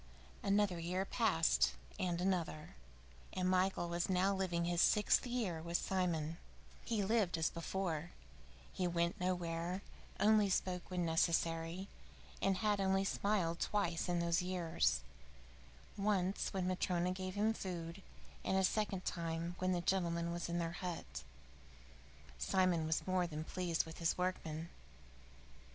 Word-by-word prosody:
VIII - - -6
Another 200 -3 +3
year 180 +3 -1
passed, 195 -8 +3 0.3
and 175 -2 0
another, 175 -4 -1 0.6
and 185 0 0
Michael 185 -1 +2
was 170 +1 -1
now 190 +2 +3
living 180 -3 0
his 175 0 +2
sixth 210 +3 +4
year 220 -10 -1
with 170 +1 0
Simon. 170 -4 -1 0.5
He 220 -4 0
lived 200 -4 +2
as 160 - +1
before. 170 -1 -2 0.6
He 180 - 0
went 170 +3 0
nowhere, 180 +1 -1 0.4
only 210 0 +5
spoke 180 -1 -1
when 180 -2 -1
necessary, 165 +2 +1 0.5
and 195 -1 +2
had 205 -1 +3
only 190 0 +3
smiled 195 -5 0
twice 180 -4 0
in 175 - +2
all 170 - 0
those 170 +1 +2
years 175 - +1 0.9
once 195 -2 0
when 190 -2 -1
Matryona 180 -1 +1
gave 185 0 -4
him 215 +2 +2
food, 175 -2 -5 0.4
and 190 - +1
a 190 - +3
second 195 -1 0
time 170 0 -2
when 185 0 +1
the 175 -1 +1
gentleman 170 -2 0
was 170 0 -3
in 170 - -1
their 165 -1 -1
hut. 160 - -4 1.2
Simon 175 - +2
was 160 - 0
more 185 -1 +1
than 155 -1 -4
pleased 175 -1 -1
with 160 0 -9
his 165 -1 +1
workman. 170 -3 -2
180 Hz, 140 wpm, -37 LUFS, 170-190 Hz, 1.2 s, only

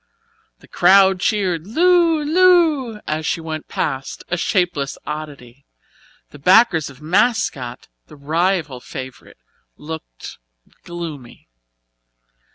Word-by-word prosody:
The - - -18
crowd 190 +1 +4
cheered 185 -5 -1
"Lu 335 - +3
Lu" 315 -8 +3
as 155 +1 -3
she 165 - -1
went 160 -1 -6
past, 135 -2 -4
a 175 - 0
shapeless 175 -6 -1
oddity. 140 -4 -8 0.7
The 145 - -13
backers 180 - +4
of 140 +2 -15
"Mascot", 175 - 0 0.2
the - - -14
rival 155 -1 -1
favourite, 130 +1 -10 0.4
looked 155 - -9 0.5
gloomy. 160 - -9
170 Hz, 100 wpm, -19 LUFS, 145-210 Hz, 0.7 s, crowd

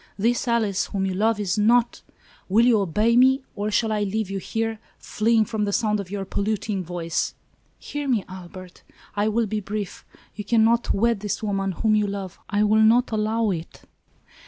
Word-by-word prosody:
This 235 +5 0
Alice 220 -5 +1
whom 195 -2 -2
you 190 - -1
love 215 +3 +1
is 205 0 -1
not 235 +3 +3
— - - -30
" - - -31
"Will 220 +5 +4
you 235 -3 +4
obey 210 +5 +1
me, 265 +2 +5
or 205 +1 -2
shall 220 +1 +1
I 210 -1 0
leave 205 0 -2
you 195 - -2
here, 225 +3 -3 0.2
fleeing 220 0 +1
from 220 -1 -2
the 200 - -1
sound 210 0 +1
of 195 -3 -6
your 195 -1 -4
polluting 200 -1 -2
voice?" 170 -1 -3 0.2
" - - -41
Hear 290 -1 -5
me, 230 -7 +1
Albert! 185 -1 -11 0.3
I 205 +1 +1
will 225 +2 +1
be 215 +1 -2
brief. 205 -1 -5 0.3
You 210 - -6
can 225 +2 +3
not 235 +1 +2
wed 230 +1 +1
this 210 +1 -4
woman, 195 -2 -1
whom 215 +4 +1
you 210 -1 +2
love. 195 -2 -6
I 205 0 +1
will 215 +1 +4
not 235 +3 +4
allow 220 0 0
it 165 -2 -6
210 Hz, 205 wpm, -24 LUFS, 195-225 Hz, 0.3 s, me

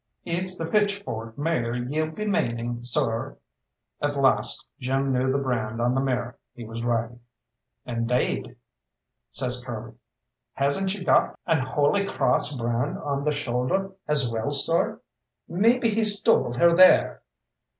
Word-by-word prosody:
"It's 180 +2 -1
the 165 - -3
'pitchfork' 200 - -2
mare 145 -6 -1
ye'll 145 +6 -2
be 185 +7 -6
maning, 120 - -2
sorr?" 115 -1 -1 0.6
At 145 0 -1
last 135 -1 +1
Jim 135 +1 -1
knew 130 +1 +1
the 135 - +1
brand 115 -5 -2
on 120 +1 +1
the 135 - +1
mare 125 -2 -2 0.2
he 120 - -9
was 115 +1 -7
riding. 120 0 -2 0.7
"Indade," 120 0 -2 0.7
says 125 -1 -2
Curly, 120 -2 -7 0.6
"hasn't 140 +8 +1
she 190 -1 -3
got - - +2
an 165 -2 +2
Holy 145 +9 +1
Crawss 150 -6 +1
brand 120 +3 -2
on 140 -1 -3
the 150 - +2
shoulder 145 +7 -1 0.2
as 150 -4 +3
well, 115 +2 -2
sorr? 145 +4 +2 0.5
Maybe 230 +6 +2
he 220 +1 0
stole 205 - +4
her 170 +7 +4
there." 185 +1 +5
135 Hz, 140 wpm, -25 LUFS, 120-170 Hz, 0.7 s, there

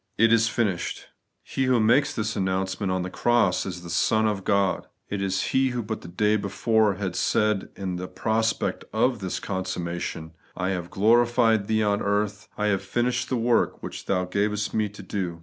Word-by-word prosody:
' - - -46
It 115 - +4
is 115 0 +4
finished! 105 -8 -2 0.2
' - - -52
He 135 - -1
who 130 -2 +3
makes 120 +6 +4
this 110 -1 -2
announce 95 -1 -1
ment 100 -3 -1
on 95 -1 0
the 90 - -4
cross 120 -7 +2
is 90 -2 -6
the 85 - -8
Son 110 +5 +2
of 100 -3 -2
God; 100 -2 +1 0.2
it 100 -1 -2
is 95 -1 0
He 130 0 +2
who 120 -2 -3
but 110 +1 -4
the - - -10
day 105 +5 +1
before 105 +1 +1
had 95 -2 -3
said 105 +1 +1
in 95 -2 -4
the 90 +1 -5
prospect 110 +2 -1
of 120 +2 +2
this 95 -2 -3
consummation, 90 -4 -4
' - - -29
I 90 +1 -1
have 90 -2 -3
glorified 115 0 +3
Thee 110 0 +2
on 100 -1 +1
the - - -4
earth, 105 0 -1
I 105 - 0
have 100 -2 +1
finished 120 0 -1
the 130 - 0
work 115 0 +1
which - - -7
Thou 90 -2 +1
gavest 105 +3 -1
me 110 -1 +1
to 105 +1 -11
do.' 90 -3 -4
105 Hz, 210 wpm, -25 LUFS, 95-110 Hz, 0.2 s, It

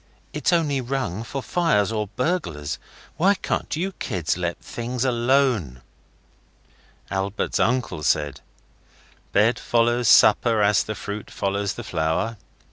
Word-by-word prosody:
It's - - 0
only 150 -6 +1
rung 125 -6 -3
for 135 +4 -5
fire 165 - +2
or 105 -1 -1
burglars. 105 - -2 0.4
Why 195 +4 +4
can't - - -2
you 185 +5 -2
kids 95 - -2
let 85 -1 -2
things 120 +2 -4
alone?' 120 - +1 1.3
Albert's 95 +1 -1
uncle 120 -9 0
said 75 -2 0 0.9
'Bed 110 +4 +3
follows 120 0 +2
supper 110 0 +5
as 105 0 +4
the 110 - -4
fruit 105 0 -6
follows 100 0 -2
the - - -6
flower. 85 +8 -1
110 Hz, 125 wpm, -23 LUFS, 95-130 Hz, 1.3 s, supper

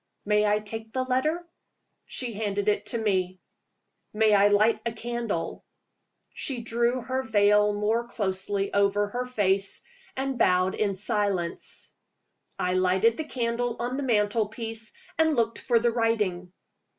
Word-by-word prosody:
"May 210 0 +3
I 210 0 +3
take 220 +1 -7
the 260 - 0
letter?" 305 +7 0 0.6
She 245 -3 -3
handed 205 -1 -2
it 210 0 +1
to 235 - +2
me. 185 -4 0 0.7
"May 215 0 +3
I 200 0 +6
light 210 +2 +3
a 230 - -2
candle?" 230 -6 -4 0.7
She 255 -4 -3
drew 235 +2 0
her 260 +1 -1
veil 210 -3 +3
more 220 +3 0
closely 195 -2 -2
over 200 0 +2
her 250 +3 -3
face, 195 -5 +1 0.3
and 270 -1 -2
bowed 185 +1 +3
in 200 -2 0
silence. 200 -4 -1 0.6
I 180 - 0
lighted 185 +5 +2
the 315 - -3
candle 240 -3 -1
on 245 +2 -3
the - - -2
mantel 215 -4 +1
piece, 225 0 -2 0.3
and 320 -1 +4
looked 230 -2 0
for 240 -2 +2
the 235 +1 +2
writing. 210 -6 0
220 Hz, 145 wpm, -26 LUFS, 200-235 Hz, 0.7 s, I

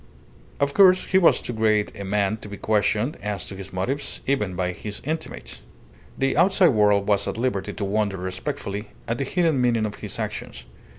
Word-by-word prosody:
Of 140 0 +1
course, 185 0 +6
he 190 - +3
was 175 - +4
too 120 - -5
great 110 -2 +2
a 100 - -6
man 100 +1 0
to 105 - -10
be 100 - -7
questioned 110 - +1
as 105 -2 -2
to - - -7
his 95 0 -9
motives, 125 +10 -3
even 105 -9 0
by 90 0 -1
his 100 +3 -7
intimates. 160 +2 -5 0.6
The 135 0 +1
outside 180 +1 +5
world 105 -4 +3
was 100 -1 +2
at - - -3
liberty 110 -4 -1
to 100 - -3
wonder 100 -1 0
respectfully 95 +3 -4 0.2
at 115 +1 -2
the 140 - 0
hidden 165 -3 +1
meaning 115 -3 +2
of 105 - -5
his - - -6
actions. 60 -1 -5
105 Hz, 190 wpm, -24 LUFS, 100-135 Hz, 0.6 s, course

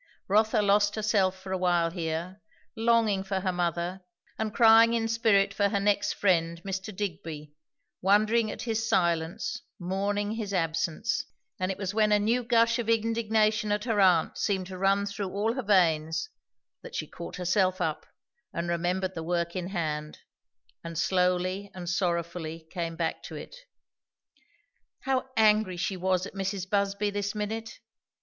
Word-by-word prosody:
Rotha 215 +2 +3
lost 205 +1 +3
herself 205 -3 +1
for 190 0 -8
a 190 - -1
while 175 -2 +2
here, 170 +2 -4 0.3
longing 225 -3 +2
for 190 0 -2
her 185 -1 0
mother, 175 +1 -2 0.4
and 220 -1 -1
crying 230 +1 +6
in 225 -1 0
spirit 220 -3 +3
for 200 0 +2
her 200 - 0
next 205 0 +1
friend, 170 -4 +1
Mr. 195 -1 -4
Digby; 160 -6 -5 0.5
wondering 215 +4 +3
at - - -6
his 225 -2 -1
silence, 170 +5 0 0.2
mourning 200 +3 -1
his 215 -3 -3
absence; 165 +5 -1 0.3
and 185 +1 0
it 190 - -5
was 195 -1 -3
when 215 0 +3
a 210 - +6
new 225 +4 +1
gush 230 0 +3
of 230 -1 -2
indignation 220 -1 +1
at 210 0 0
her 225 -4 0
aunt 180 -4 +3
seemed 190 -3 0
to 185 0 -8
run 195 +1 +2
through 200 -1 -4
all 210 +4 0
her 260 - -3
veins, 170 - +2 0.5
that - - -10
she - - -2
caught - - -8
herself 185 +1 +1
up 160 -4 -2 0.4
and 170 0 -3
remembered 180 +2 -1
the 165 - -5
work 170 +1 -2
in 180 -1 -3
hand, 155 -5 -3 0.7
and 165 -1 -6
slowly 185 +2 +1
and 180 -1 -7
sorrowfully 170 -2 -2
came 170 -3 -3
back 165 0 -2
to - - -9
it. - - -9 1.5
How 265 -1 -1
angry 215 -4 +4
she 190 +2 -1
was 185 0 0
at - - -9
Mrs. 195 -1 -3
Busby 200 +1 0
this 205 +1 -3
minute! 220 +2 -4
195 Hz, 160 wpm, -28 LUFS, 175-215 Hz, 1.5 s, crying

